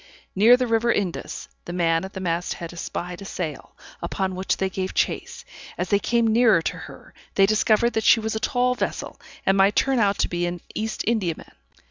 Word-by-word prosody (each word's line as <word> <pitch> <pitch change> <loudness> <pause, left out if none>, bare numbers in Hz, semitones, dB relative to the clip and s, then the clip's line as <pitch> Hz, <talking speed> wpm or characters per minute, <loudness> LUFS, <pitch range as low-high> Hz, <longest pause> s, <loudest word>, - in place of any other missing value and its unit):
Near 225 +6 +7
the 255 - 0
river 230 0 +2
Indus, 190 -6 -3 0.2
the 175 - -6
man 165 -1 +1
at 190 - -7
the 190 - -5
mast 175 -1 -2
head 170 0 -7
espied 175 +1 -5
a - - -8
sail, 160 -7 -6 0.3
upon 190 -1 -2
which 185 +1 -1
they 190 - 0
gave 190 0 -4
chase; - - -2 0.3
as 180 0 -2
they 200 - +3
came 235 +2 +1
nearer 220 -6 +4
to - - -2
her, - - -12 0.2
they 195 - +6
discovered 215 +3 +2
that 220 - 0
she 230 - +6
was 220 0 -3
a - - -1
tall 250 +2 +1
vessel, - - -4 0.2
and 195 0 +3
might 195 +1 +4
turn 270 -2 +2
out 200 -2 +2
to - - +1
be 175 0 -1
an 175 0 -4
East 220 +1 -3
Indiaman. 200 -8 -1
195 Hz, 205 wpm, -24 LUFS, 180-225 Hz, 0.3 s, Near